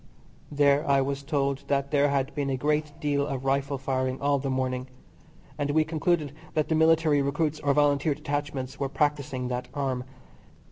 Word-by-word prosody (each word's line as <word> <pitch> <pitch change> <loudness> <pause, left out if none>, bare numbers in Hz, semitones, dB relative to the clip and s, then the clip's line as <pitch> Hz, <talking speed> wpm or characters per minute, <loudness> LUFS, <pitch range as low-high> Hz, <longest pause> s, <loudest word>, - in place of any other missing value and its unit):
There 145 0 +3
I 140 0 +5
was 135 +1 -1
told 140 -2 -1
that 140 0 0
there 145 -1 +3
had 140 0 0
been 140 -2 -2
a 135 - 0
great 150 +2 0
deal 145 -1 0
of 135 -2 -4
rifle 140 +1 0
firing 130 -1 -1
all 140 0 +2
the 135 +1 -3
morning, 130 -1 -1 0.7
and 145 0 0
we 155 +2 +3
concluded 155 -2 0 0.2
that 155 -1 +1
the - - +2
Military 160 -2 +4
recruits 150 +2 -1
or 140 -2 +1
Volunteer 145 0 +3
detachments 145 -3 -4
were 140 -1 -1
practising 140 -3 -1
that 125 0 -3
arm. 135 -3 -1
140 Hz, 175 wpm, -27 LUFS, 135-150 Hz, 0.7 s, I